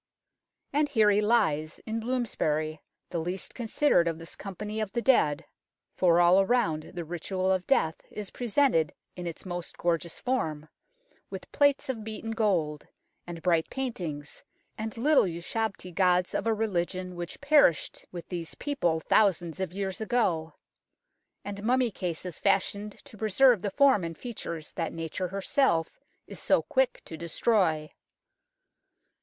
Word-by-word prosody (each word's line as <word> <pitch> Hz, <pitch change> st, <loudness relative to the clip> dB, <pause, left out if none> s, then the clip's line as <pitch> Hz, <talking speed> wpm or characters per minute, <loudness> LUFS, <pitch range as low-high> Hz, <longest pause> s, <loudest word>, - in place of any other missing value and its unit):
And 295 Hz, +1 st, +2 dB
here 220 Hz, -6 st, +4 dB
he 205 Hz, +1 st, +3 dB
lies, 190 Hz, -9 st, +1 dB
in 225 Hz, +1 st, -2 dB
Bloomsbury, 155 Hz, -11 st, -1 dB, 0.3 s
the 170 Hz, -, -1 dB
least 180 Hz, +3 st, -4 dB
considered 235 Hz, -5 st, +2 dB
of 165 Hz, -1 st, -1 dB
this 165 Hz, 0 st, -8 dB
company 210 Hz, +2 st, -6 dB
of 210 Hz, -3 st, -3 dB
the 235 Hz, -, 0 dB
dead; 150 Hz, -, +3 dB, 0.5 s
for 175 Hz, -2 st, +4 dB
all 175 Hz, +2 st, +6 dB
around 195 Hz, -8 st, 0 dB
the 170 Hz, -1 st, -4 dB
ritual 185 Hz, +3 st, -2 dB
of 185 Hz, -1 st, 0 dB
death 160 Hz, -13 st, +2 dB
is 210 Hz, -2 st, -7 dB
presented 240 Hz, -, +1 dB, 0.2 s
in 180 Hz, -1 st, -5 dB
its 170 Hz, -, -7 dB
most 175 Hz, -2 st, -5 dB
gorgeous 170 Hz, -1 st, -1 dB
form, 160 Hz, -13 st, -2 dB, 0.6 s
with -, -, -8 dB
plates 285 Hz, -1 st, +3 dB
of 240 Hz, -5 st, -3 dB
beaten 220 Hz, +1 st, -5 dB
gold, 180 Hz, -10 st, 0 dB, 0.4 s
and 170 Hz, -1 st, -7 dB
bright 170 Hz, -3 st, +2 dB
paintings, 175 Hz, -, -5 dB, 0.3 s
and 220 Hz, +1 st, -5 dB
little 285 Hz, +3 st, +4 dB
ushabti 185 Hz, +2 st, -3 dB
gods 180 Hz, 0 st, +2 dB
of 215 Hz, -, -1 dB
a 225 Hz, -, +3 dB
religion 185 Hz, -3 st, -2 dB
which 175 Hz, 0 st, -6 dB
perished 280 Hz, -, +3 dB
with 175 Hz, -2 st, -8 dB
these 170 Hz, -3 st, -5 dB
people 175 Hz, -, -1 dB
thousands 175 Hz, -4 st, +2 dB
of 190 Hz, -3 st, -2 dB
years 190 Hz, +1 st, -3 dB
ago, 185 Hz, -8 st, 0 dB, 0.9 s
and 200 Hz, 0 st, -5 dB
mummy 245 Hz, +2 st, +2 dB
cases 180 Hz, -2 st, -4 dB
fashioned 200 Hz, +1 st, +1 dB
to 215 Hz, -, -13 dB
preserve 220 Hz, +1 st, +4 dB
the 205 Hz, -, -1 dB
form 265 Hz, -3 st, +4 dB
and 165 Hz, -1 st, -5 dB
features 170 Hz, -10 st, -6 dB
that 165 Hz, -3 st, -3 dB
Nature 165 Hz, +3 st, -3 dB
herself 190 Hz, -, 0 dB, 0.3 s
is -, -, -10 dB
so -, -, +2 dB
quick 260 Hz, -1 st, 0 dB
to 160 Hz, -, -7 dB
destroy. 170 Hz, -1 st, +1 dB
190 Hz, 145 wpm, -28 LUFS, 170-225 Hz, 0.9 s, all